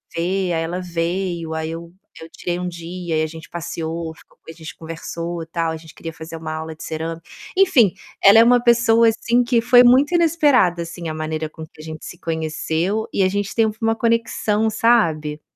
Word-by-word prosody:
ver, 180 +1 -1
aí 165 0 0
ela 175 +3 -3
veio, 170 -1 -3
aí 160 0 -3
eu 165 +1 -8 0.3
eu 160 - -10
tirei 175 +1 -4
um 180 - -3
dia 170 -1 -4
e - - +2
aí 155 - 0
gente 160 0 -11
passeou, 165 -1 -5
ficou 150 - -22
a - - -5
gente 160 -1 -10
conversou 165 +1 -6
tal. 165 0 -1
A 160 - -4
gente 160 -1 -15
queria 165 - -7
fazer 160 +1 -9
uma 160 -1 -5
aula 160 0 -6
de - - -11
cerâmica, 165 +1 -5 0.4
enfim, 315 - +5 0.3
ela 200 +3 +8
é - - +8
uma 245 +1 +4
pessoa 235 -1 +4
assim 235 +2 +1
que 240 -1 +2
foi 245 +1 +6
muito 260 +6 +5
inesperada 295 - +3
assim 170 0 -7
a - - -3
maneira 155 0 -3
com 160 +1 -10
que 155 - -16
a - - -11
gente 155 0 -8
se - - -9
conheceu, 160 +5 -2
e 195 - +2
a 185 - +3
gente 200 +1 -2
teve 220 -2 +2
uma 225 0 +2
conexão, 225 -2 0
sabe? 165 -10 +1
170 Hz, 205 wpm, -20 LUFS, 160-225 Hz, 0.4 s, ela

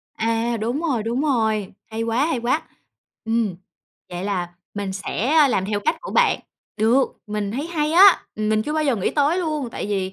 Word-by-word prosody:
À, 230 +1 0
đúng 245 +8 -1
rồi, 260 -10 0
đúng 240 +4 -1
rồi, 220 -9 0 0.2
hay 225 +1 -3
quá, 230 +5 +1
hay 320 -7 -1
quá. 255 +7 +1 0.6
Ừm, 225 -5 0 0.6
vậy 175 +2 -5
là 185 -4 -1 0.3
mình 200 -2 -3
sẽ, 200 +4 -3
a, 305 -2 +5
làm 190 -6 +1
theo 205 0 -1
cách 315 +6 0
của - - -7
bạn. - - +3 0.4
Được, 235 +5 +3
mình 210 -1 -3
thấy 285 +6 -3
hay 310 -2 -1
á, 380 +2 +8 0.2
mình 215 0 +1
chưa 300 - -3
bao 310 0 0
giờ 265 -5 +2
nghĩ 195 - 0
tới 300 +4 +2
luôn, 305 -7 -2
tại - - -5
vì 190 -2 -2
230 Hz, 200 wpm, -22 LUFS, 210-295 Hz, 0.6 s, á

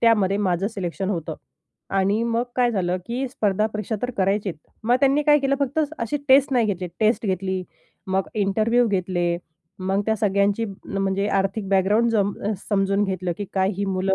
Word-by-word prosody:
त्यामध्ये 210 -4 +3
माझं 190 -2 0
सिलेक्शन 190 -2 -3
होतं. 165 -4 -3 0.6
आणि 195 +3 +1
मग 235 0 +1
काय 245 -1 +3
झालं 185 -4 0
की 250 +3 -2
स्पर्धा 210 -4 +1
परीक्षा 215 0 -3
तर 250 - -1
करायचीच. 195 -2 0 0.3
मग 245 +2 +4
त्यांनी 280 +1 +4
काय 295 0 +5
केलं 275 -1 +1
फक्त 280 +2 -1 0.2
असे 230 +5 -1
टेस्ट 270 +1 +5
नाही 240 -3 +3
घेतले, 185 -3 -2
टेस्ट 220 0 +2
घेतली, 190 0 -1 0.4
मग 190 0 0
इंटरव्ह्यू 220 +4 +2
घेतले, 175 -3 0 0.4
मग 190 +2 0
त्या 220 - +2
सगळ्यांची 200 +1 +1 0.3
म्हणजे 195 +1 0
आर्थिक 195 +1 0
बॅकग्राऊंड 205 +5 +3
जम 205 -3 +1 0.2
अ, - - +1 0.2
समजून 195 0 +2
घेतलं 185 -2 -2
की 205 - -2
काय 190 0 +2
ही 200 - -1
मुलं 190 0 0
200 Hz, 175 wpm, -23 LUFS, 190-230 Hz, 0.6 s, काय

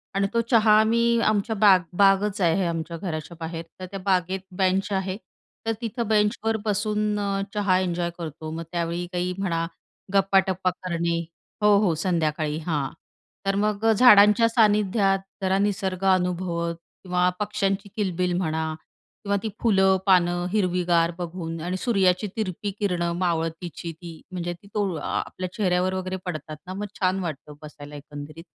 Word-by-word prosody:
आणि 195 0 +2
तो 230 - +2
चहा 220 -2 +5
आम्ही 235 +1 +3
आमच्या 215 +1 +1
बाग 195 -2 +6 0.2
बागच 200 +1 +4
आहे 175 +2 +2
आमच्या 165 0 -3
घराच्या 165 -1 -5
बाहेर, 165 0 -5 0.2
तर 185 - -5
त्या 195 - -5
बागेत 185 0 +1 0.2
बेंच 190 0 +2
आहे. 190 0 -1 0.5
तर 225 - +1
तिथं 230 0 -3
बेंचवर 215 +1 +1
बसून 210 0 0
अ, 200 -1 -1
चहा 200 -3 +2
एन्जॉय 175 -2 -1
करतो. 155 -1 -6
मग 165 +1 -4
त्यावेळी 170 0 -2
काही 180 0 -1
म्हणा, 170 -4 -1 0.5
गप्पाटप्पा 190 -1 +3
करणे 170 -1 -2 0.5
हो, 210 -1 +6
हो 170 - +2
संध्याकाळी, 155 -4 0
हां. 145 -4 0 0.6
तर 195 - +1
मग 210 +1 0
अ, 225 - +6
झाडांच्या 210 -1 +7
सानिध्यात, 210 -3 +3 0.2
जरा 190 0 +2
निसर्ग 195 -2 -1
अनुभवत 175 -2 -1 0.3
किंवा 180 -1 +2
पक्ष्यांची 205 -1 -1
किलबिल 180 -4 0
म्हणा 160 -3 -1 0.5
किंवा 200 -1 0
ती 220 - -1
फुलं, 190 -4 +4
पानं 175 -2 +3
हिरवीगार 180 -4 +2
बघून 165 -2 -5
आणि 180 +3 -2
सूर्याची 195 -4 +2
तिरपी 200 -1 -2
किरणं 175 -4 0
मावळतीची 170 -1 -2
ती 170 -2 -9
म्हणजे 175 -1 -3
ती 175 +4 -17
तो 205 -3 0
आ 150 - -5
आपल्या 185 0 -5
चेहऱ्यावर 185 -3 +1
वगैरे 185 0 -3
पडतात 155 -3 -5
ना, 185 - -5
मग 205 +2 -4
छान 185 0 +1
वाटतं 150 -3 -6
बसायला 150 -1 -10
एकंदरीत. 145 +2 -9
185 Hz, 150 wpm, -25 LUFS, 170-205 Hz, 0.6 s, झाडांच्या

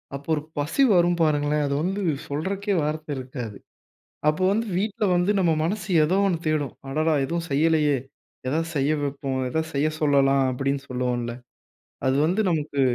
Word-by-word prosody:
அப்போ 140 +3 -9
ஒரு 150 - -3 0.2
பசி 150 - +1
வரும் 175 -1 +3
பாருங்களேன், 150 -1 +2
அது 140 - -1
வந்து 195 +3 -1 0.3
சொல்றக்கே 195 +8 -2
வார்த்தை 155 0 -3
இருக்காது. 125 -5 -6 0.7
அப்போ 155 +5 -1
வந்து 225 +3 0
வீட்ல 210 +2 -1
வந்து 175 +3 +2
நம்ம 175 -3 +3
மனசு 195 +3 -2 0.2
ஏதோ 180 +5 +2
ஒண்ணு 180 -3 +1
தேடும். 150 -4 0 0.2
"அடடா 155 +3 +1
எதுவும் 170 +4 -3
செய்யலையே! 150 0 +3 0.5
எதாவது 160 +5 0
செய்ய 140 +1 +2
வெப்போம் 135 -1 -2
எதாவது 160 +4 -2
செய்ய 145 +2 +1
சொல்லலாம்," 140 -2 +4
அப்படின்னு 135 +2 -1
சொல்லுவோம்ல, 125 -2 -2 0.7
அது 130 - +2
வந்து 185 +7 +1
நமக்கு 150 -4 -1
150 Hz, 155 wpm, -24 LUFS, 140-170 Hz, 0.7 s, சொல்லலாம்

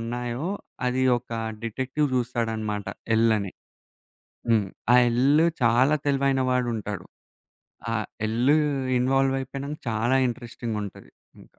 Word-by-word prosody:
ఉన్నాయో 120 +5 -3 0.4
అది 130 +1 +1 0.2
ఒక 120 - -23 0.3
డిటెక్టివ్ 130 +6 -1
జూస్తాడనమాట 115 -4 -2 0.3
'ఎల్' 115 0 +4
అని. 100 -2 -5 1.0
హ్మ్. 105 -4 +3 0.3
ఆ - - +8
'ఎల్' 140 +7 +4 0.2
చాలా 125 +5 +4
తెలివైన 135 -1 +2
వాడుంటాడు. 115 -7 -2 0.9
ఆ! - - 0 0.3
'ఎల్' 120 +6 +3 0.5
ఇన్వాల్వ్ 135 +1 +2
అయిపోయినాంక 140 +3 -5
చాలా 115 +4 +2
ఇంట్రెస్టింగ్ 120 -2 -5
ఉంటది 100 - -10 0.3
ఇంకా. - - -21
120 Hz, 110 wpm, -25 LUFS, 115-135 Hz, 1.0 s, ఆ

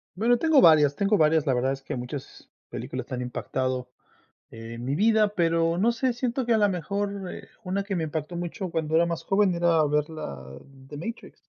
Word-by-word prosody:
Bueno, 235 +5 +3
tengo 315 -2 +4
varias, 150 - +6
tengo 200 +1 +2
varias. 155 -2 +3
La 130 - +2
verdad 130 +2 +1
es 135 0 -7
que 145 0 -5
muchas 125 +3 -8 0.2
películas - - -5
que - - -6
han 125 - -3
impactado 130 0 -3 0.6
en 115 +1 -9
mi 135 +2 -1
vida, 215 +3 +3
pero 165 0 +2
no 225 +5 +3
sé, 245 +1 0
siento 245 +1 -2
que 235 - +2
a - - +4
la 205 - +4
mejor 200 +1 -3
eh - - -10 0.2
una 195 +2 -2
que 200 -1 -3
me 165 - -1
impactó 155 +2 -4
mucho 175 +2 -4
cuando 160 -1 -1
era 170 - +5
más 170 -1 -3
joven 195 -2 +2
era 170 -2 +3
ver 150 +1 0
la 70 - -7 0.2
de 135 +1 -13
Matrix. 230 +10 -7
165 Hz, 210 wpm, -26 LUFS, 145-200 Hz, 0.6 s, varias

